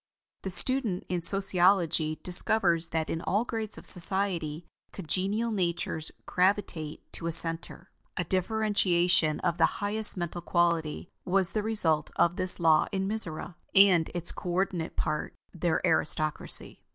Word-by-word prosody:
The 190 Hz, -, -5 dB
student 225 Hz, -1 st, +4 dB
in 180 Hz, -1 st, -2 dB
Sociology 175 Hz, -4 st, +1 dB
discovers 175 Hz, -2 st, +3 dB
that 160 Hz, -1 st, -3 dB
in 165 Hz, -, -4 dB
all 205 Hz, +7 st, -1 dB
grades 220 Hz, -3 st, -4 dB
of -, -, -11 dB
society, 175 Hz, -4 st, +1 dB, 0.3 s
congenial 195 Hz, +6 st, -2 dB
natures 170 Hz, -5 st, -3 dB
gravitate 180 Hz, -5 st, -2 dB
to 170 Hz, -, -5 dB
a -, -, -2 dB
center. 165 Hz, +2 st, +1 dB, 0.3 s
A 175 Hz, -, -1 dB
differentiation 180 Hz, -4 st, 0 dB
of 175 Hz, 0 st, -2 dB
the 165 Hz, -, +4 dB
highest 210 Hz, 0 st, +3 dB
mental 175 Hz, 0 st, -5 dB
quality 170 Hz, -2 st, -2 dB
was 190 Hz, 0 st, 0 dB
the 215 Hz, -, -2 dB
result 175 Hz, -9 st, 0 dB
of 170 Hz, +1 st, +1 dB
this 185 Hz, 0 st, +1 dB
law 160 Hz, -2 st, +3 dB
in 195 Hz, -1 st, -3 dB
Mizora, 180 Hz, -5 st, -1 dB, 0.2 s
and 190 Hz, -5 st, +4 dB
its 175 Hz, -1 st, +1 dB
co 180 Hz, -, -8 dB
ordinate 175 Hz, -2 st, -3 dB
part, 150 Hz, -, -4 dB, 0.2 s
their 175 Hz, -2 st, -1 dB
aristocracy. 155 Hz, 0 st, -1 dB
180 Hz, 140 wpm, -27 LUFS, 165-195 Hz, 0.3 s, student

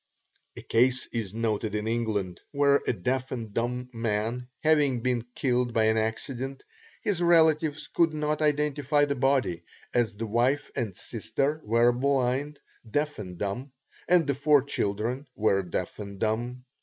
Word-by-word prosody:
A -, -, -8 dB
case 125 Hz, +2 st, +2 dB
is 110 Hz, -5 st, -2 dB
noted 110 Hz, -2 st, -1 dB
in 105 Hz, +1 st, -2 dB
England 110 Hz, -6 st, -1 dB
where 140 Hz, -1 st, +3 dB
a -, -, +4 dB
deaf 125 Hz, +5 st, -2 dB
and 115 Hz, -5 st, -5 dB
dumb 125 Hz, +2 st, -2 dB
man 115 Hz, +2 st, -2 dB, 0.2 s
having 145 Hz, -6 st, +3 dB
been 125 Hz, -1 st, 0 dB
killed 125 Hz, -2 st, +1 dB
by 110 Hz, -, +4 dB
an 110 Hz, 0 st, +3 dB
accident, 130 Hz, +4 st, -3 dB, 0.4 s
his 205 Hz, -6 st, 0 dB
relatives 160 Hz, -3 st, +4 dB
could 165 Hz, -1 st, +2 dB
not 150 Hz, 0 st, -1 dB
identify 150 Hz, -1 st, +2 dB
the 140 Hz, -, -1 dB
body, 130 Hz, -10 st, +1 dB, 0.3 s
as 115 Hz, -3 st, +1 dB
the 115 Hz, +2 st, -4 dB
wife 125 Hz, +6 st, +1 dB
and 115 Hz, -8 st, -2 dB
sister 150 Hz, -, -2 dB
were 115 Hz, +2 st, +4 dB
blind, 135 Hz, +2 st, 0 dB, 0.3 s
deaf 145 Hz, +3 st, -1 dB
and 90 Hz, -4 st, -7 dB
dumb, 115 Hz, +8 st, -4 dB, 0.3 s
and 175 Hz, -2 st, +5 dB
the 140 Hz, -, +1 dB
four 145 Hz, 0 st, +4 dB
children 120 Hz, +1 st, -2 dB
were 100 Hz, -2 st, +2 dB
deaf 90 Hz, +1 st, -4 dB
and 100 Hz, -2 st, -7 dB
dumb. 120 Hz, +3 st, -2 dB
125 Hz, 155 wpm, -27 LUFS, 110-145 Hz, 0.4 s, and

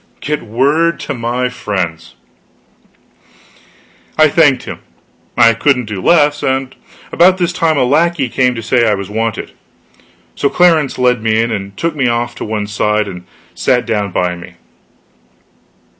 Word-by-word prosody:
Get 150 Hz, 0 st, -3 dB
word 140 Hz, +9 st, +1 dB
to -, -, -4 dB
my 120 Hz, +1 st, -2 dB
friends! 90 Hz, -9 st, -4 dB, 2.0 s
I 155 Hz, 0 st, +5 dB
thanked 145 Hz, -3 st, +3 dB
him; -, -, -7 dB, 0.6 s
I 115 Hz, -1 st, +6 dB
couldn't 125 Hz, +1 st, +1 dB
do 105 Hz, -3 st, -5 dB
less; 150 Hz, -, +3 dB
and 130 Hz, 0 st, -2 dB, 0.4 s
about 185 Hz, +2 st, +4 dB
this 175 Hz, -1 st, -1 dB
time 165 Hz, -4 st, +1 dB
a -, -, +3 dB
lackey 150 Hz, +2 st, +1 dB
came 125 Hz, +1 st, +1 dB
to 115 Hz, -, -6 dB
say 115 Hz, 0 st, +2 dB
I 105 Hz, -, +2 dB
was 100 Hz, 0 st, -7 dB
wanted; 110 Hz, 0 st, -3 dB, 0.8 s
so 140 Hz, -, 0 dB
Clarence 165 Hz, -5 st, +2 dB
led 125 Hz, -2 st, +2 dB
me 110 Hz, 0 st, +1 dB
in 115 Hz, +1 st, 0 dB
and 100 Hz, -2 st, -5 dB
took 165 Hz, -1 st, -2 dB
me 135 Hz, -4 st, +1 dB
off 120 Hz, 0 st, -1 dB
to -, -, -5 dB
one 105 Hz, -1 st, -3 dB
side 105 Hz, 0 st, 0 dB
and 90 Hz, -2 st, -9 dB, 0.3 s
sat 125 Hz, -2 st, +1 dB
down 105 Hz, -3 st, -2 dB
by 90 Hz, 0 st, -1 dB
me. 85 Hz, +1 st, -12 dB
125 Hz, 155 wpm, -14 LUFS, 105-145 Hz, 2.0 s, I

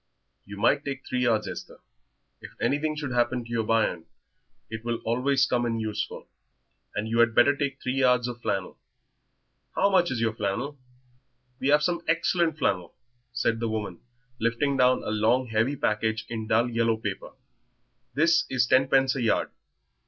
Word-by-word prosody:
"You 100 Hz, 0 st, -9 dB
might 130 Hz, +7 st, +2 dB
take 140 Hz, -1 st, -5 dB
three 130 Hz, -, -2 dB
yards, 115 Hz, -4 st, +1 dB
Esther; -, -, -8 dB, 0.6 s
if -, -, -11 dB
anything 145 Hz, +5 st, 0 dB
should 145 Hz, -3 st, -4 dB
happen 120 Hz, 0 st, +1 dB
to -, -, -13 dB
yer 115 Hz, -1 st, +1 dB
bairn 110 Hz, -6 st, 0 dB, 0.6 s
it 110 Hz, 0 st, -7 dB
will 120 Hz, 0 st, -1 dB
always 130 Hz, +3 st, +2 dB
come 125 Hz, -3 st, 0 dB
in 115 Hz, -1 st, -1 dB
useful. 110 Hz, -1 st, -4 dB, 0.7 s
And 105 Hz, +1 st, -2 dB
you 115 Hz, +1 st, 0 dB
had 115 Hz, -1 st, +4 dB
better 140 Hz, +4 st, +5 dB
take 140 Hz, -1 st, -3 dB
three 130 Hz, +1 st, -2 dB
yards 125 Hz, -2 st, +3 dB
of 120 Hz, -1 st, -7 dB
flannel. 95 Hz, -4 st, -3 dB, 1.0 s
How 200 Hz, -, +3 dB
much 180 Hz, -2 st, +3 dB
is 125 Hz, -, -2 dB
yer 115 Hz, -1 st, +1 dB
flannel?" 120 Hz, +8 st, -3 dB, 0.8 s
"We 135 Hz, -, -1 dB
have 150 Hz, +1 st, +4 dB
some 170 Hz, +1 st, 0 dB
excellent 165 Hz, -1 st, +1 dB
flannel," 95 Hz, -, -1 dB, 0.4 s
said 120 Hz, -2 st, 0 dB
the 115 Hz, -1 st, -1 dB
woman, 105 Hz, -5 st, -4 dB, 0.4 s
lifting 120 Hz, +5 st, 0 dB
down 125 Hz, -1 st, +3 dB
a -, -, -3 dB
long, 110 Hz, +4 st, +2 dB
heavy 115 Hz, +6 st, +1 dB
package 110 Hz, -2 st, -1 dB
in 110 Hz, -2 st, -4 dB
dull 115 Hz, +3 st, +3 dB
yellow 115 Hz, -1 st, +1 dB
paper; 105 Hz, -3 st, -5 dB, 0.8 s
"this 165 Hz, +3 st, +3 dB
is 130 Hz, -3 st, +2 dB
ten 130 Hz, +2 st, +3 dB
pence 135 Hz, 0 st, +3 dB
a 135 Hz, -, -2 dB
yard. 115 Hz, -, +1 dB
120 Hz, 170 wpm, -26 LUFS, 110-135 Hz, 1.0 s, better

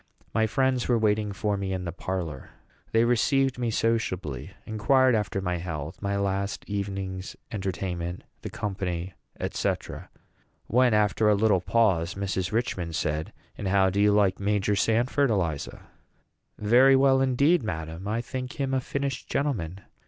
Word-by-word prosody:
My 110 Hz, -1 st, +2 dB
friends 130 Hz, +2 st, +1 dB
were 120 Hz, -, +3 dB
waiting 105 Hz, -1 st, +1 dB
for 100 Hz, +1 st, -1 dB
me 95 Hz, -1 st, -2 dB
in 95 Hz, -1 st, -3 dB
their 85 Hz, -, -3 dB
parlor. 85 Hz, -6 st, -4 dB, 0.4 s
They 115 Hz, +1 st, +4 dB
received 130 Hz, +2 st, +2 dB
me 120 Hz, -2 st, 0 dB
sociably, 95 Hz, -, -1 dB, 0.2 s
inquired 130 Hz, +4 st, +3 dB
after 105 Hz, -3 st, 0 dB
my 90 Hz, -2 st, -1 dB
health, 80 Hz, -3 st, -5 dB
my 100 Hz, 0 st, -1 dB
last 100 Hz, 0 st, -2 dB
evening's 95 Hz, -2 st, -4 dB, 0.2 s
entertainment, 90 Hz, -3 st, -3 dB, 0.2 s
the -, -, -5 dB
company, 95 Hz, -3 st, -3 dB, 0.4 s
&c. -, -, +1 dB, 0.9 s
when, 125 Hz, -2 st, +3 dB
after 105 Hz, +1 st, +3 dB
a 105 Hz, -, +5 dB
little 100 Hz, -3 st, +3 dB
pause, 95 Hz, -5 st, +2 dB
Mrs. 95 Hz, -2 st, -2 dB
Richman 95 Hz, -7 st, -1 dB
said, 80 Hz, -1 st, -2 dB, 0.2 s
"And 100 Hz, -, -4 dB
how 95 Hz, 0 st, +3 dB
do 100 Hz, +2 st, +1 dB
you 105 Hz, 0 st, +5 dB
like 100 Hz, -2 st, +3 dB
Major 105 Hz, 0 st, +1 dB
Sanford, 120 Hz, +7 st, +2 dB
Eliza?" 85 Hz, -9 st, -2 dB, 0.7 s
"Very 125 Hz, +6 st, +5 dB
well 135 Hz, 0 st, +4 dB
indeed, 140 Hz, +6 st, +3 dB
madam; 80 Hz, -3 st, -5 dB
I 110 Hz, +3 st, 0 dB
think 125 Hz, +1 st, -5 dB
him 135 Hz, -1 st, -2 dB
a 130 Hz, -, +1 dB
finished 140 Hz, 0 st, -3 dB
gentleman. 100 Hz, -, -2 dB
100 Hz, 150 wpm, -27 LUFS, 95-120 Hz, 0.9 s, a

